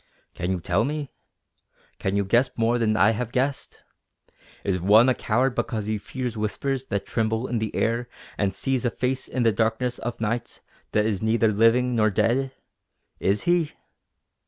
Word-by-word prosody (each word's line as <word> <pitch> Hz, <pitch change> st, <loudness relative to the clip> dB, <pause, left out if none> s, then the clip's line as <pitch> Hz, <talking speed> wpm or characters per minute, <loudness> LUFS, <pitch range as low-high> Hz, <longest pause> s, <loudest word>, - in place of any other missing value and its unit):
"Can 90 Hz, +1 st, -3 dB
you 95 Hz, -1 st, 0 dB
tell 90 Hz, +5 st, +1 dB
me? 145 Hz, +1 st, -3 dB, 0.9 s
Can 95 Hz, 0 st, -1 dB
you 100 Hz, 0 st, +1 dB
guess 120 Hz, +6 st, +3 dB
more 115 Hz, +1 st, +2 dB
than 110 Hz, -2 st, +1 dB
I 105 Hz, -, +5 dB
have 115 Hz, +1 st, -3 dB
guessed? 135 Hz, +3 st, -2 dB, 0.8 s
Is 95 Hz, -2 st, 0 dB
one 105 Hz, +6 st, +6 dB
a -, -, +4 dB
coward 125 Hz, +3 st, +1 dB
because 110 Hz, -4 st, -2 dB
he 110 Hz, 0 st, -1 dB
fears 125 Hz, +2 st, -5 dB
whispers 130 Hz, +5 st, -2 dB
that 100 Hz, 0 st, -2 dB
tremble 110 Hz, +1 st, -1 dB
in 120 Hz, -3 st, -1 dB
the 110 Hz, -1 st, -3 dB
air 120 Hz, +2 st, 0 dB, 0.3 s
and 100 Hz, -2 st, 0 dB
sees 130 Hz, +6 st, -1 dB
a 120 Hz, -, +2 dB
face 130 Hz, +2 st, -2 dB
in 130 Hz, -, -1 dB
the 115 Hz, -, +4 dB
darkness 115 Hz, +4 st, 0 dB
of 120 Hz, -, -5 dB
night 115 Hz, +2 st, -3 dB, 0.3 s
that 105 Hz, 0 st, +3 dB
is 105 Hz, -4 st, -1 dB
neither 110 Hz, 0 st, +2 dB
living 115 Hz, +4 st, +3 dB
nor 110 Hz, -2 st, +3 dB
dead? 130 Hz, +6 st, +1 dB, 0.7 s
Is 100 Hz, +2 st, +1 dB
he?" 175 Hz, -3 st, +1 dB
115 Hz, 175 wpm, -25 LUFS, 105-125 Hz, 0.9 s, one